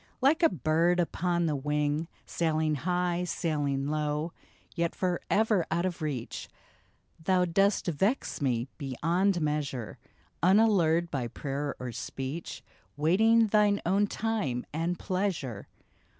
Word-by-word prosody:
Like 285 Hz, +6 st, +3 dB
a 330 Hz, -, +6 dB
bird 165 Hz, -, +2 dB
upon 175 Hz, 0 st, 0 dB
the 155 Hz, -2 st, 0 dB
wing, 150 Hz, +2 st, -1 dB, 0.2 s
Sailing 155 Hz, -2 st, 0 dB
high, 175 Hz, +3 st, 0 dB
sailing 145 Hz, -5 st, -1 dB
low, 150 Hz, +2 st, -1 dB, 0.4 s
Yet 170 Hz, -1 st, -1 dB
forever 190 Hz, +2 st, +1 dB
out 170 Hz, +3 st, 0 dB
of 175 Hz, -2 st, -3 dB
reach, 140 Hz, -7 st, -4 dB, 0.7 s
Thou 185 Hz, +1 st, +3 dB
dost 195 Hz, +4 st, +2 dB
vex 190 Hz, -, 0 dB
me 125 Hz, -3 st, 0 dB
beyond 170 Hz, +8 st, +1 dB
measure, 140 Hz, -6 st, -2 dB, 0.4 s
Unallured 175 Hz, -3 st, +4 dB
by 130 Hz, -4 st, -2 dB
prayer 140 Hz, +3 st, -4 dB
or 125 Hz, -1 st, -4 dB
speech, 135 Hz, +7 st, -6 dB, 0.3 s
Waiting 220 Hz, +9 st, +4 dB
thine 210 Hz, -1 st, +3 dB
own 200 Hz, +4 st, +3 dB
time 200 Hz, -, -2 dB
and 165 Hz, +3 st, -1 dB
pleasure 180 Hz, -, -2 dB
165 Hz, 120 wpm, -29 LUFS, 150-185 Hz, 0.7 s, a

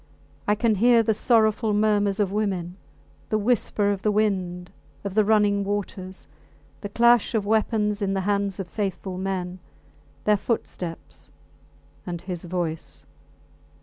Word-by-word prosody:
I 210 Hz, -, +3 dB
can 225 Hz, +1 st, +2 dB
hear 235 Hz, -1 st, +6 dB
the 220 Hz, -, +2 dB
sorrowful 220 Hz, -1 st, +2 dB
murmurs 205 Hz, -1 st, +2 dB
of 200 Hz, -2 st, +1 dB
women, 190 Hz, -4 st, -2 dB, 0.5 s
the 215 Hz, -, +1 dB
whisper 210 Hz, -2 st, +1 dB
of 195 Hz, -1 st, -3 dB
the 210 Hz, -, +2 dB
wind, 185 Hz, -4 st, -1 dB, 0.3 s
of 200 Hz, -2 st, -4 dB
the 215 Hz, +1 st, +4 dB
running 205 Hz, -1 st, +3 dB
waters; 195 Hz, -2 st, -4 dB, 0.5 s
the 205 Hz, -, -6 dB
clash 235 Hz, +2 st, +4 dB
of 210 Hz, -2 st, 0 dB
weapons 210 Hz, -1 st, +1 dB
in 195 Hz, -1 st, 0 dB
the 195 Hz, -, 0 dB
hands 200 Hz, 0 st, -1 dB
of 190 Hz, -, -4 dB
faithful 190 Hz, -1 st, -4 dB
men, 185 Hz, -1 st, -3 dB, 0.6 s
their 210 Hz, -1 st, +3 dB
footsteps 185 Hz, -5 st, -5 dB, 0.8 s
and 175 Hz, -1 st, -3 dB
his 180 Hz, 0 st, -6 dB
voice! 170 Hz, -2 st, -4 dB
205 Hz, 140 wpm, -24 LUFS, 185-215 Hz, 0.8 s, hear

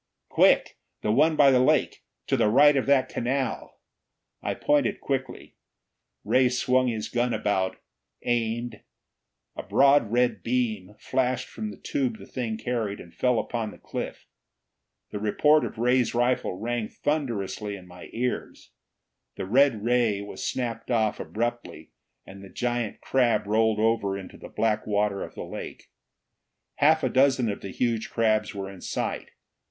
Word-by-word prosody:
"Quick! -, -, +3 dB, 0.2 s
The 105 Hz, -, +1 dB
one 155 Hz, +7 st, +4 dB
by 145 Hz, -2 st, +6 dB
the 130 Hz, -, +4 dB
lake! 130 Hz, -, +2 dB, 0.2 s
To -, -, +1 dB
the 105 Hz, -, +3 dB
right 145 Hz, +6 st, +6 dB
of 135 Hz, -, 0 dB
that 140 Hz, -2 st, +4 dB
canal!" 130 Hz, +1 st, -3 dB, 0.6 s
I -, -, -2 dB
pointed 145 Hz, -1 st, +1 dB
quickly. 130 Hz, -2 st, -4 dB, 0.7 s
Ray 130 Hz, -1 st, +3 dB
swung 130 Hz, +1 st, +2 dB
his 110 Hz, -3 st, -2 dB
gun 120 Hz, 0 st, 0 dB
about, 95 Hz, -2 st, -1 dB, 0.5 s
aimed. 120 Hz, -1 st, -1 dB, 0.7 s
A -, -, -4 dB
broad 135 Hz, -5 st, +4 dB
red 125 Hz, +1 st, +1 dB
beam 110 Hz, -5 st, -2 dB
flashed 125 Hz, +2 st, -1 dB
from 215 Hz, -1 st, -6 dB
the -, -, -10 dB
tube 260 Hz, -6 st, -2 dB
the -, -, -12 dB
thing 115 Hz, -4 st, -4 dB
carried, 110 Hz, -3 st, -3 dB
and 85 Hz, -, -12 dB
fell 125 Hz, -2 st, +1 dB
upon 115 Hz, -1 st, -2 dB
the -, -, -12 dB
cliff. -, -, -6 dB, 0.9 s
The 105 Hz, -, -4 dB
report 150 Hz, +9 st, +3 dB
of -, -, -5 dB
Ray's 125 Hz, 0 st, +2 dB
rifle 120 Hz, -5 st, +1 dB
rang 120 Hz, 0 st, -2 dB
thunderously 115 Hz, -8 st, -2 dB
in 95 Hz, -2 st, -12 dB
my 90 Hz, 0 st, -12 dB
ears. 125 Hz, +2 st, -4 dB, 0.6 s
The -, -, -4 dB
red 120 Hz, 0 st, +3 dB
ray 120 Hz, -4 st, +2 dB
was 100 Hz, 0 st, -7 dB
snapped 115 Hz, -3 st, -3 dB
off 110 Hz, -3 st, +1 dB
abruptly, 120 Hz, +2 st, -4 dB, 0.3 s
and 100 Hz, +1 st, -12 dB
the 100 Hz, -, -11 dB
giant 120 Hz, -2 st, -3 dB
crab 125 Hz, -5 st, +2 dB
rolled 110 Hz, +1 st, +2 dB
over 110 Hz, -3 st, +1 dB
into 95 Hz, -2 st, -10 dB
the -, -, -10 dB
black 110 Hz, -1 st, 0 dB
water 105 Hz, -1 st, 0 dB
of -, -, -7 dB
the -, -, -5 dB
lake. -, -, -9 dB, 0.9 s
Half 155 Hz, +2 st, +4 dB
a 130 Hz, -, +2 dB
dozen 130 Hz, -3 st, +3 dB
of 100 Hz, -, -7 dB
the 100 Hz, -, -6 dB
huge 115 Hz, +2 st, -1 dB
crabs 110 Hz, -2 st, +1 dB
were 100 Hz, -1 st, -4 dB
in 95 Hz, -2 st, -11 dB
sight. -, -, -3 dB
120 Hz, 155 wpm, -26 LUFS, 105-130 Hz, 0.9 s, by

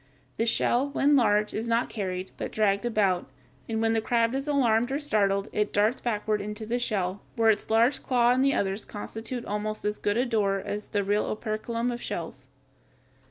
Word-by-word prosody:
The 230 Hz, -, 0 dB
shell, 245 Hz, +4 st, +2 dB
when 280 Hz, +1 st, +3 dB
large, 210 Hz, -4 st, +3 dB
is 225 Hz, +2 st, -3 dB
not 230 Hz, +1 st, +1 dB
carried, 185 Hz, -3 st, -4 dB
but -, -, -5 dB
dragged 210 Hz, +1 st, +1 dB
about, 195 Hz, -6 st, +1 dB, 0.4 s
and 220 Hz, -1 st, -1 dB
when 225 Hz, 0 st, +2 dB
the 225 Hz, -, +1 dB
crab 230 Hz, +1 st, +1 dB
is 270 Hz, +2 st, -2 dB
alarmed 245 Hz, -4 st, +2 dB
or 275 Hz, -, 0 dB
startled 200 Hz, -8 st, +1 dB
it 210 Hz, -, 0 dB
darts 215 Hz, +5 st, +2 dB
backward 215 Hz, -2 st, -1 dB
into 210 Hz, +2 st, -5 dB
the 240 Hz, +3 st, -1 dB
shell, 195 Hz, -5 st, -2 dB
where 225 Hz, -1 st, +5 dB
its 210 Hz, -, -3 dB
large 230 Hz, +5 st, +3 dB
claw 245 Hz, -2 st, +3 dB
and 255 Hz, +1 st, +3 dB
the 275 Hz, 0 st, +3 dB
others 195 Hz, +1 st, -1 dB
constitute 225 Hz, +3 st, -6 dB
almost 210 Hz, +1 st, -3 dB
as 210 Hz, 0 st, -1 dB
good 205 Hz, +1 st, 0 dB
a 250 Hz, -, +2 dB
door 210 Hz, -5 st, +1 dB
as 205 Hz, +2 st, -5 dB
the 205 Hz, -2 st, -1 dB
real 205 Hz, +2 st, +1 dB
operculum 230 Hz, +2 st, -2 dB
of 240 Hz, 0 st, -5 dB
shells. 135 Hz, -6 st, -6 dB
220 Hz, 195 wpm, -27 LUFS, 205-240 Hz, 0.4 s, where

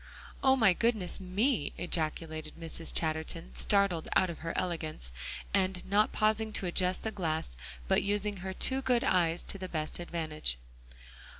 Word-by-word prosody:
"Oh, 265 Hz, 0 st, +6 dB
my 220 Hz, -8 st, +5 dB
goodness 215 Hz, -3 st, +1 dB
me," 195 Hz, -, 0 dB
ejaculated 155 Hz, -2 st, -2 dB
Mrs. 165 Hz, 0 st, -1 dB
Chatterton, 155 Hz, -, -2 dB
startled 175 Hz, -, +3 dB
out 185 Hz, -2 st, +4 dB
of 165 Hz, -, -9 dB
her 165 Hz, +1 st, -3 dB
elegance, 160 Hz, -, -3 dB, 0.4 s
and 190 Hz, -2 st, +1 dB
not 205 Hz, +2 st, +3 dB
pausing 220 Hz, 0 st, +1 dB
to 195 Hz, -, -3 dB
adjust 180 Hz, +1 st, 0 dB
the 220 Hz, -, -2 dB
glass, 160 Hz, -, -2 dB, 0.3 s
but -, -, +4 dB
using 205 Hz, 0 st, 0 dB
her 190 Hz, +1 st, -5 dB
two 265 Hz, +7 st, +2 dB
good 250 Hz, -2 st, +2 dB
eyes 170 Hz, -2 st, +2 dB
to 200 Hz, -, -3 dB
the 185 Hz, -1 st, -5 dB
best 155 Hz, 0 st, -3 dB
advantage. 160 Hz, -, -1 dB
180 Hz, 155 wpm, -31 LUFS, 160-205 Hz, 0.4 s, Oh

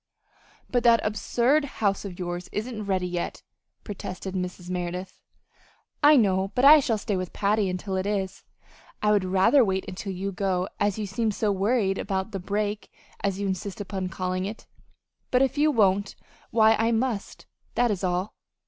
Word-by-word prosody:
"But 245 Hz, -, +1 dB
that 235 Hz, -1 st, +6 dB
absurd 240 Hz, +7 st, +1 dB
house 200 Hz, -2 st, 0 dB
of 185 Hz, -3 st, -7 dB
yours 175 Hz, -1 st, -5 dB
isn't 215 Hz, 0 st, -4 dB
ready 190 Hz, -2 st, 0 dB
yet," 175 Hz, -1 st, -4 dB, 0.4 s
protested 190 Hz, -2 st, -6 dB
Mrs. 180 Hz, -1 st, -4 dB
Merideth. 180 Hz, +1 st, -4 dB, 0.8 s
"I 300 Hz, 0 st, +7 dB
know, 190 Hz, -4 st, +3 dB
but 250 Hz, -, +3 dB
I 300 Hz, +2 st, +10 dB
shall 235 Hz, -5 st, 0 dB
stay 205 Hz, -1 st, -2 dB
with 185 Hz, -1 st, -4 dB
Patty 205 Hz, -1 st, +1 dB
until 185 Hz, +2 st, -3 dB
it 190 Hz, +1 st, -1 dB
is," 195 Hz, -2 st, -2 dB
returned -, -, -42 dB
Margaret. -, -, -26 dB
"I 210 Hz, -, +4 dB
would 205 Hz, -2 st, +3 dB
rather 195 Hz, +9 st, +5 dB
wait 190 Hz, -3 st, -1 dB
until 195 Hz, +1 st, -5 dB
you 195 Hz, +2 st, -3 dB
go, 190 Hz, -2 st, -1 dB
as 205 Hz, -1 st, +1 dB
you 215 Hz, -, -2 dB
seem 215 Hz, +3 st, -1 dB
so 210 Hz, 0 st, 0 dB
worried 200 Hz, 0 st, +1 dB
about 190 Hz, +1 st, -2 dB
the 195 Hz, -, -4 dB
'break,' 205 Hz, +2 st, -3 dB, 0.3 s
as 195 Hz, -1 st, -1 dB
you 200 Hz, -, -2 dB
insist 190 Hz, +1 st, -3 dB
upon 190 Hz, -2 st, -4 dB
calling 185 Hz, +1 st, -2 dB
it; 210 Hz, +3 st, -7 dB, 0.6 s
but 255 Hz, +1 st, +3 dB
if 270 Hz, -, 0 dB
you 305 Hz, +1 st, +4 dB
won't, 200 Hz, -6 st, +2 dB, 0.3 s
why 220 Hz, -1 st, +5 dB
I 225 Hz, +1 st, +2 dB
must, 230 Hz, -2 st, -2 dB, 0.3 s
that 245 Hz, -2 st, +3 dB
is 195 Hz, -2 st, -3 dB
all. 180 Hz, +2 st, -1 dB
200 Hz, 180 wpm, -26 LUFS, 185-220 Hz, 0.8 s, I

